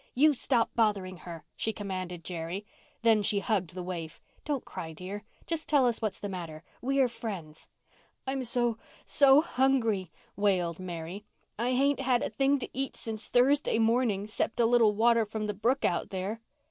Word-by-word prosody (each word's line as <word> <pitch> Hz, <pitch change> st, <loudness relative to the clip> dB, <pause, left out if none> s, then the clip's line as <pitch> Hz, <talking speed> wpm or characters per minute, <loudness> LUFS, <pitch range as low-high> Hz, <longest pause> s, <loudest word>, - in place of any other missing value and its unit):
"You 300 Hz, +4 st, +5 dB
stop 240 Hz, -3 st, +1 dB
bothering 200 Hz, -5 st, +1 dB
her," 165 Hz, -2 st, -9 dB
she 220 Hz, -, -1 dB
commanded 185 Hz, -5 st, -5 dB
Jerry. 175 Hz, +3 st, -5 dB, 0.4 s
Then 225 Hz, -2 st, +5 dB
she 205 Hz, 0 st, +1 dB
hugged 190 Hz, -3 st, -1 dB
the 180 Hz, -, -4 dB
waif. 170 Hz, -3 st, -6 dB, 0.2 s
"Don't 290 Hz, -4 st, -2 dB
cry, 160 Hz, -1 st, -7 dB
dear. 190 Hz, +5 st, -7 dB, 0.2 s
Just 330 Hz, -1 st, -3 dB
tell 285 Hz, -4 st, +5 dB
us 240 Hz, -2 st, +1 dB
what's 215 Hz, -3 st, -2 dB
the 205 Hz, -, -4 dB
matter. 170 Hz, -5 st, -6 dB, 0.2 s
We're 270 Hz, +1 st, +2 dB
friends." 190 Hz, -10 st, -7 dB, 0.6 s
"I'm 265 Hz, 0 st, -2 dB
so—so—hungry," 245 Hz, -, +2 dB, 0.2 s
wailed 185 Hz, -5 st, +1 dB
Mary. 180 Hz, +2 st, -6 dB, 0.4 s
"I—I 240 Hz, +2 st, +1 dB
hain't 280 Hz, +2 st, +2 dB
had 255 Hz, -2 st, +2 dB
a -, -, -2 dB
thing 270 Hz, +5 st, +2 dB
to 260 Hz, -, -5 dB
eat 270 Hz, +2 st, -3 dB
since 220 Hz, -1 st, -3 dB
Thursday 265 Hz, 0 st, +3 dB
morning, 225 Hz, -3 st, +2 dB
'cept 215 Hz, +2 st, -2 dB
a 235 Hz, -, +5 dB
little 225 Hz, -3 st, +4 dB
water 230 Hz, +1 st, +4 dB
from 215 Hz, 0 st, -4 dB
the 210 Hz, -, -2 dB
brook 235 Hz, +7 st, +1 dB
out -, -, 0 dB
there." 195 Hz, +4 st, -4 dB
220 Hz, 165 wpm, -29 LUFS, 185-250 Hz, 0.6 s, You